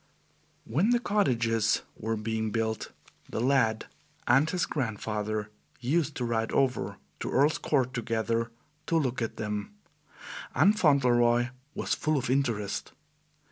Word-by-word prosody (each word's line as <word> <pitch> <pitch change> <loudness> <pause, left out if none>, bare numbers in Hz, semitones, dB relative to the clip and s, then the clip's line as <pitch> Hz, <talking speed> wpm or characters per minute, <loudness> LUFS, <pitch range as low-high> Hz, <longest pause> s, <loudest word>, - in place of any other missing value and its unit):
When 160 - +1
the 240 0 +4
cottages 115 - +1
were 110 +1 -2
being 110 0 -2
built, 110 0 -2 0.4
the - - -3
lad 115 -3 +2 0.4
and 135 +6 +4
his 180 -3 0
grandfather 110 -5 -2 0.3
used 145 +4 0
to 125 - -2
ride 115 -1 -1
over 130 -3 +1 0.2
to - - -3
Earl's 145 +3 +3
Court 130 -4 +1
together 115 -1 -1 0.4
to 165 - +2
look 130 -6 0
at 115 - -3
them, 105 - -4 0.8
and 205 +2 +5
Fauntleroy 120 - +4 0.3
was - - -1
full 155 -1 +1
of 130 -2 -1
interest. 115 -7 -1
120 Hz, 130 wpm, -29 LUFS, 110-140 Hz, 0.8 s, and